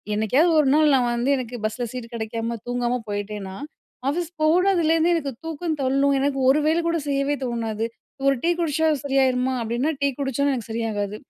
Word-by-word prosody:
என்னைக்காவது 255 - +3
ஒரு 295 - +3
நாள் 305 -1 +5
நான் 250 -2 +2
வந்து 240 +3 0
எனக்கு 245 -1 -5
பஸ்ல 220 +3 -2
சீட் 245 -1 -7
கிடைக்காம 230 +1 -3
தூங்காம 245 0 -1
போயிட்டேன்னா, 205 -1 -4 0.5
ஆஃபீஸ் 335 +3 -2
போனதுலேருந்து 335 -1 +3
எனக்கு 285 -5 -2
தூக்கம் 325 0 -3
தள்ளும். 275 +2 +2
எனக்கு 275 0 0
ஒரு 300 +3 +4
வேல 325 +2 +2
கூட 335 -1 0
செய்யவே 275 +1 0
தோணாது. 225 -2 -2 0.4
ஒரு 275 - +4
டீ 345 - +3
குடிச்சா 320 -1 +1 0.2
சரியாயிருமா 260 -1 +2
அப்டின்னா 240 +7 -1
டீ 280 - +3
குடிச்சும் 280 +1 0
எனக்கு 235 -4 -5
சரியாகாது. 215 -3 -2
270 Hz, 165 wpm, -23 LUFS, 230-310 Hz, 0.5 s, நாள்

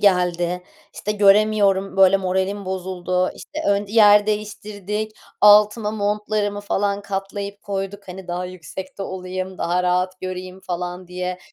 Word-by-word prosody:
geldi. 180 -2 +2 0.3
İşte, 210 - -3
göremiyorum, 200 -1 +3
böyle, 195 0 +6
moralim 190 +1 -1
bozuldu. 185 -1 -1
İşte, 300 - -9
ön 200 0 +2
yer 210 -1 +6
değiştirdik. 210 0 -3 0.3
Altıma 210 +1 +6
montlarımı 210 0 -1
falan 200 0 -1
katlayıp 200 0 -5
koyduk. 195 0 -5
Hani 180 0 -9
daha 175 +1 -2
yüksekte 185 +2 -8
olayım, 185 0 -5
daha 175 +1 0
rahat 180 +1 0
göreyim 185 0 -6
falan 180 0 -5
diye. 180 0 -4
195 Hz, 125 wpm, -22 LUFS, 185-205 Hz, 0.3 s, böyle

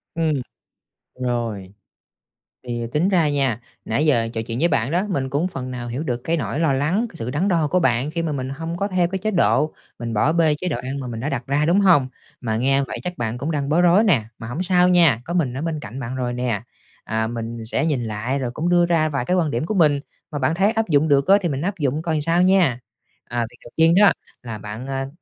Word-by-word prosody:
Ừm, 160 -2 +1 0.9
rồi. 115 -6 -3 1.0
Thì 120 -1 -3
tính 170 +6 +2
ra 170 -6 +3
nha, 135 -5 0 0.2
nãy 135 +8 0
giờ 120 -7 +3
trò 115 - -2
chuyện 115 +1 -4
với 170 - +4
bạn 135 -5 0
đó, 180 +4 +1
mình 135 -8 -1
cũng 145 +6 0
phần 130 -7 -6
nào 125 -1 -5
hiểu 125 +6 -3
được 125 -5 -2
cái 165 +1 0
nỗi 145 - -3
lo 160 -4 +2
lắng, 160 - +1
cái - - -17
sự 115 -5 -5
đắn 150 +9 0
đo 165 -5 +2
của 180 +5 +2
bạn 130 -2 +1
khi 170 - -2
mà 165 -2 -2
mình 130 -2 -3
hông 165 +5 -5
có 200 +2 -1
theo 185 -3 +1
cái 190 +2 -3
chế 215 +3 -1
độ, 155 -4 +2 0.3
mình 115 -1 -4
bỏ 135 +9 +2
bê 160 -3 +3
chế 180 - -4
độ 170 - -1
ăn 135 +2 -5
mà 130 - -5
mình 115 -2 -5
đã 135 +6 -2
đặt 125 -5 -3
ra, 145 +2 +1
đúng 180 +5 +3
hông? 170 -9 +5 0.3
Mà 110 -3 -1
nghe 135 +3 +2
vậy - - -6
chắc 180 -1 -5
bạn 120 0 -2
cũng 145 +6 -3
đang 140 -3 -2
bối 165 +4 +3
rối 180 +4 +5
nè, 165 - +3
mà 110 - -8
hổng 130 +9 -4
sao 180 -1 +4
nha, 170 -10 +5
có 170 - -4
mình 155 -9 +1
ở 130 - -4
bên 160 -1 -2
cạnh 130 -1 -8
bạn 125 -1 -5
rồi 125 -1 -2
nè, 120 -4 -1 0.4
à, 110 0 -1
mình 115 0 -5
sẽ 110 - +1
nhìn 145 -7 0
lại 115 +5 -2
rồi 125 -3 -3
cũng 155 +7 -2
đưa 175 -1 +4
ra 165 -2 +2
vài 140 -4 -2
cái 180 - +1
quan 160 -4 +1
điểm 120 +4 -1
của 210 - -2
mình, 150 -6 +4 0.3
mà 145 - -3
bạn 140 +5 +1
thấy 195 +4 +3
áp 225 -3 -1
dụng 150 0 +3
được 140 -2 +3
á 195 +1 +7
thì 175 - -1
mình 140 -2 -2
áp 195 +4 -2
dụng 145 +1 0
coi 160 -2 -1
sao 165 +3 +2
nha. 180 -9 +3 0.4
À, 120 -1 -2
việc 120 - -19
đầu 120 - -13
tiên 165 +1 +5
đó 200 -4 +7 0.3
là 115 -3 -6
bạn, 105 +5 -7
à, 135 0 -3
145 Hz, 260 wpm, -22 LUFS, 120-170 Hz, 1.0 s, á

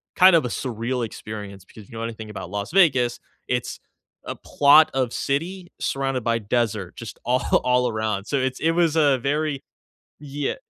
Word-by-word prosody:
kind 185 -1 +7
of 155 - +3
a - - -2
surreal 120 0 -3
experience 105 -3 -8
because 105 -3 -15
you 115 - -10
know 115 - -4
anything 110 -2 -6
about 100 -3 -7
Las 100 0 -4
Vegas, 130 -10 +3 0.3
it's 125 -1 -2 0.5
a - - -5
plot 145 +2 +5
of 130 -3 0
city 175 +6 -3
surrounded 135 -3 -1
by 115 -1 +1
desert 105 -3 -2
just 115 - -9
all 125 +2 +2 0.2
all 125 0 +2
around. 110 -2 -2
So, 140 - -1
it's 130 0 -1
it 165 - +2
was 165 -2 +2
a 145 -4 +4
very 145 +2 -1 0.6
Yeah. 145 -1 -3
125 Hz, 175 wpm, -23 LUFS, 110-145 Hz, 0.6 s, kind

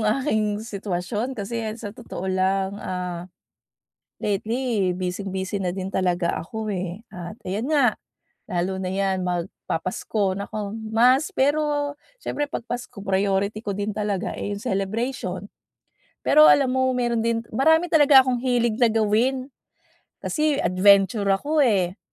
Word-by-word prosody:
aking 215 -2 +1
sitwasyon 210 +4 -3
kasi 225 +3 -3 0.2
sa 205 -3 -7
totoo 230 -5 -8
lang, 190 +1 +1
ah, 180 -1 -4 0.9
lately 215 -1 0
bising-busy 190 +2 -3
na 180 -2 -2
din 190 0 -4
talaga 180 -2 +1
ako 220 +5 -5
eh, 185 +1 -4
at 175 +2 -7
ayan 200 +6 -3
nga 280 -7 +3 0.5
lalo 185 +2 -1
na 185 - -2
'yan 190 0 0
magpapasko, 180 +2 -2
naku! 200 +1 -5 0.2
Mas 250 +6 +4
pero 290 +1 +1 0.2
siyempre 290 -12 -3
'pag 235 - -5
Pasko 245 -2 -6
priority 200 +1 0
ko 200 -3 -4
din 205 +1 -2
talaga 205 -2 -2
eh - - -4
'yong 205 - -10
celebration. 195 -1 -2 0.8
Pero 305 0 +7
alam 275 -3 +5
mo, 260 0 +1
meron 240 -2 0
din, 230 0 0
marami 320 +8 +3
talaga 290 -4 +7
akong 255 -1 0
hilig 240 -3 +1
na 245 - +5
gawin. 225 +5 +1 0.7
Kasi 305 -1 +1
adventure 200 +3 +4
ako 285 +11 +1
eh. 195 -7 +2
210 Hz, 135 wpm, -24 LUFS, 190-250 Hz, 0.9 s, Pero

